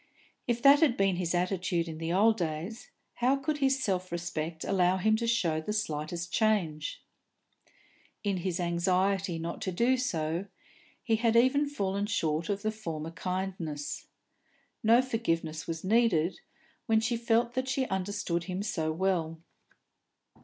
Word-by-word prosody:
If 235 -1 -1
that 280 +1 +8
had 295 -7 +3
been 195 -2 +2
his 175 -1 -1
attitude 180 -1 0
in 160 -1 -6
the 165 0 -2
old 215 +5 +4
days, 175 +8 -4 0.3
how 250 +3 +3
could 295 +2 -2
his 270 -1 +2
self 185 -2 -1
respect 165 -1 -4
allow 185 -1 +2
him 215 +4 +3
to 230 +1 -2
show 170 -9 +1
the 210 +7 -3
slightest 170 -3 -3
change? 180 -9 0 1.2
In 200 -2 0
his 180 -1 -2
anxiety 180 +1 +1
not 165 +1 -5
to 185 - -2
do 235 +8 +2
so, 170 -6 -2 0.6
he 225 -2 +2
had 230 0 +2
even 270 +5 +4
fallen 200 -6 -1
short 165 -6 -1
of 200 0 -2
the 215 - +1
former 165 -7 -5
kindness. 170 -5 -4 0.7
No 230 +3 +5
forgiveness 165 -10 -2
was 165 -1 -4
needed, 190 -5 +2 0.5
when 220 -2 +4
she 230 +2 0
felt 235 0 +1
that 260 +1 -1
she 260 0 0
understood 190 -3 -2
him 185 +1 -3
so 160 -7 -1
well. 165 -2 -1
190 Hz, 150 wpm, -30 LUFS, 170-225 Hz, 1.2 s, that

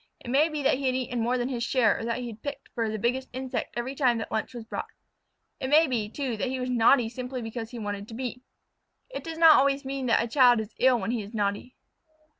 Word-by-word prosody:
It 240 - -6
may 295 +5 +4
be 305 -2 -4
that 270 -1 +2
he 275 - -1
had 255 - +1
eaten 245 -2 -2
more 240 +2 +1
than 245 +1 -1
his 240 -3 -2
share 235 -3 +2
or - - -5
that 230 0 -1
he - - -5
had 225 -2 -8
picked 285 -1 -6
for 230 -2 -1
the 215 - -3
biggest 250 +4 -1
insect 260 -1 -4
every 245 +3 -3
time 255 -4 +2
that 225 - -5
lunch 220 - -2
was 235 - -6
brought. - - -5 0.7
It 260 - -3
may 310 +3 +6
be, 235 -7 -2
too, 255 -2 -3
that 235 - -1
he 260 +1 -3
was 250 0 -2
naughty 240 0 +4
simply 250 +2 -5
because 225 0 -5
he 245 - -8
wanted 205 -2 -5
to 225 - -9
be. 250 0 -5 0.7
It - - -6
does 325 -1 -6
not 325 -2 +8
always 275 0 +2
mean 270 -1 -3
that 230 - +3
a - - -3
child 245 -1 +5
is 220 0 -6
ill 255 -2 +4
when 200 +2 -2
he 240 -2 -1
is 205 +3 -9
naughty. 205 +4 -2
245 Hz, 260 wpm, -27 LUFS, 225-265 Hz, 0.7 s, not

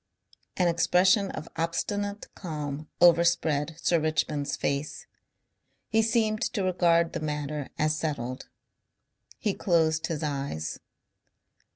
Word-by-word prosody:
An 180 - +3
expression 185 +4 +3
of 155 - -6
obstinate 205 +5 -2
calm 150 -4 -5
overspread 165 -3 +4
Sir 170 0 +2
Richmond's 155 -2 -1
face. 140 +2 -2 0.8
He 220 0 +3
seemed 220 -1 +1
to 205 -5 -1
regard 170 -2 +2
the - - -2
matter 150 -2 -3
as 155 0 +2
settled. 130 -6 -4 0.9
He 210 -3 -1
closed 160 -4 +1
his 160 -2 -3
eyes. 135 - -3
165 Hz, 105 wpm, -27 LUFS, 150-180 Hz, 0.9 s, overspread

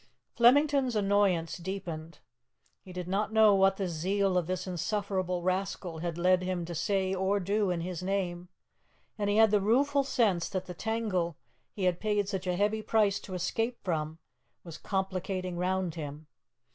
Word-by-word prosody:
'" - - -52
Flemington's 270 +1 +4
annoyance 200 -5 +2
deepened. 170 -4 -6 0.6
He 185 - -12
did 180 -1 -6
not 200 +3 -1
know 220 -1 +6
what 195 0 +4
the 195 - -1
zeal 190 +3 0
of 180 -3 +1
this 185 0 -2
insufferable 185 -1 -2
rascal 185 -2 -2
had 170 0 -3
led 180 +1 +3
him 180 -2 -2
to 170 - -6
say 190 +3 0
or 190 +2 +1
do 200 +2 0
in 175 -2 -1
his 180 0 -4
name, 180 -2 -2 0.7
and 205 -1 0
he 205 - +2
had 220 -1 +6
the 210 -1 +3
rueful 275 +7 +3
sense 215 -10 +1
that 185 -2 -3
the 180 - -7
tangle 190 -5 -2 0.3
he 200 - -5
had 180 -1 +1
paid 210 -2 0
such 195 -2 -3
a 180 - +1
heavy 210 +3 +1
price 210 -2 +2
to 185 - -8
escape 225 +7 -1
from 160 -3 -2 0.5
was 165 -3 -9
complicating 190 -1 -2
round 185 -1 0
him. 150 -1 -7
190 Hz, 170 wpm, -30 LUFS, 175-205 Hz, 0.7 s, know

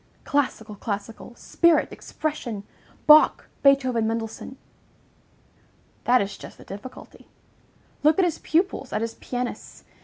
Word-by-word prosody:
Classical, 255 -6 -1
classical! 210 +3 -6
Spirit! 340 +5 +2
Expression! 245 -9 -5 0.4
Bach, 305 0 +6
Beethoven, 260 -5 +3
Mendelssohn!" 225 +3 -4 1.5
That 245 -2 +4
is 200 - -7
just - - -11
the - - -13
difficulty. 205 +6 -11 0.7
Look 305 +1 +4
at 380 - +4
his 340 - -2
pupils, 325 -5 0
at 215 - 0
his 230 0 -3
pianists! 245 -1 -5
250 Hz, 115 wpm, -24 LUFS, 220-295 Hz, 1.5 s, Bach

